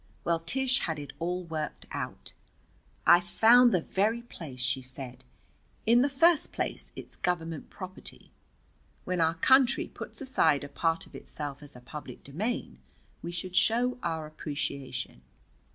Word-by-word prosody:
Well, 170 -1 +1
Tish 260 +10 +2
had 160 -2 -2
it 145 -2 -7
all 180 +2 -1
worked 160 -3 -4
out. - - -5 0.7
"I've 175 0 +7
found 240 +6 +7
the 180 - +2
very 220 +7 0
place," 155 - -9
she 130 +1 0
said. 130 0 -8 0.6
"In 235 +2 +6
the 280 - +3
first 310 +3 +4
place, - - -3
it's - - -9
Government 165 -3 -2
property. 185 -1 -8 0.7
When 180 -1 0
our 165 0 +3
country 260 +8 +4
puts - - -9
aside 260 - +2
a 145 - -7
part 165 +3 0
of - - -19
itself 145 -2 -6
as 145 -2 -10
a 125 - -11
public 150 +4 -9
domain 205 - -3 0.4
we 170 - -5
should 180 +1 -4
show 245 +5 +3
our 160 -2 -2
appreciation. 140 - -4
170 Hz, 150 wpm, -29 LUFS, 150-230 Hz, 0.7 s, I've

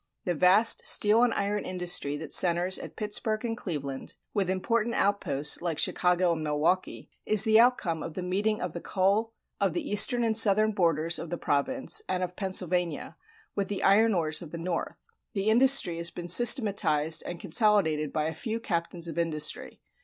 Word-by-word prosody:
The 180 - -1
vast 185 +7 +4
steel 215 +2 +3
and 245 -1 +2
iron 205 0 -2
industry 180 -5 -1
that 160 - -9
centers 175 +1 +3
at - - -10
Pittsburgh 215 +1 -2
and 225 -1 -3
Cleveland, 145 - -6 0.2
with 195 -3 -1
important 230 +5 -1
outposts 150 -8 +1
like 170 -3 -3
Chicago 180 -1 +1
and 160 -1 -5
Milwaukee, 155 +5 -2
is 215 -1 +4
the 220 0 +4
outcome 230 -10 +1
of 160 0 -8
the 185 - -5
meeting 205 +4 -2
of 180 -3 -5
the 170 - -7
coal 200 +4 -1 0.3
of 195 -4 0
the 175 - -4
eastern 240 +4 +3
and 225 -1 0
southern 215 0 +3
borders 170 -4 0
of 170 - -8
the 175 - -4
province 265 - -1
and 185 0 -2
of 180 0 -6
Pennsylvania, 180 -4 -3 0.4
with 200 -1 -2
the 200 -1 -4
iron 215 +2 +3
ores 155 -3 0
of 170 - -10
the 170 - -8
north. 170 0 -5 0.4
The 200 +2 0
industry 245 -7 +4
has 170 0 +1
been 175 0 -8
systematized 180 - +3
and 175 -1 -7
consolidated 175 - +1
by 155 - -2
a 160 - -3
few 220 +8 -5
captains 170 -4 -4
of 165 +1 -5
industry. 155 -3 -3
185 Hz, 180 wpm, -27 LUFS, 165-215 Hz, 0.4 s, vast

